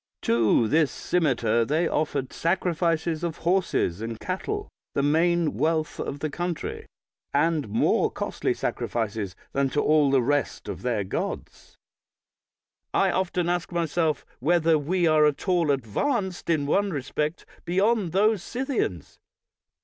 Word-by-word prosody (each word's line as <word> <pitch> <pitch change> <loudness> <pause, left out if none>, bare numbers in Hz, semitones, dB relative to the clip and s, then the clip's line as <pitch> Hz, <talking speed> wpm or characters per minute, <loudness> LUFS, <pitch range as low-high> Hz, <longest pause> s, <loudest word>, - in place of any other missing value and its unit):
To 115 0 +3
this 155 +3 +3
cimeter 125 -9 +1
they 155 +8 +1
offered 145 -4 -1
sacrifices 170 -2 0
of 170 -2 -2
horses 175 - +1
and 115 0 -5
cattle, 410 - -3 0.3
the 140 - +1
main 165 +2 +2
wealth 155 0 0
of 140 0 -4
the 155 - -1
country, 175 0 -4 0.5
and 150 -4 +1
more 110 - +2
costly - - -2
sacrifices 105 -5 -3 0.2
than 135 -1 +1
to 145 - -1
all 150 -2 +4
the 135 -2 +3
rest 145 +2 -1
of - - -5
their 120 -5 0
gods. 95 - -5 1.2
I - - +3
often 180 -2 0
ask 175 0 -1
myself 165 -2 0
whether 165 +3 +3
we 175 +5 0
are 155 -2 +5
at 150 - -3
all 175 -4 +2
advanced 175 - -1
in 155 -4 +2
one 200 +7 +2
respect 150 +1 -3 0.2
beyond 195 +1 +1
those 210 +2 +3
Scythians. 245 - -3
160 Hz, 135 wpm, -26 LUFS, 140-175 Hz, 1.2 s, are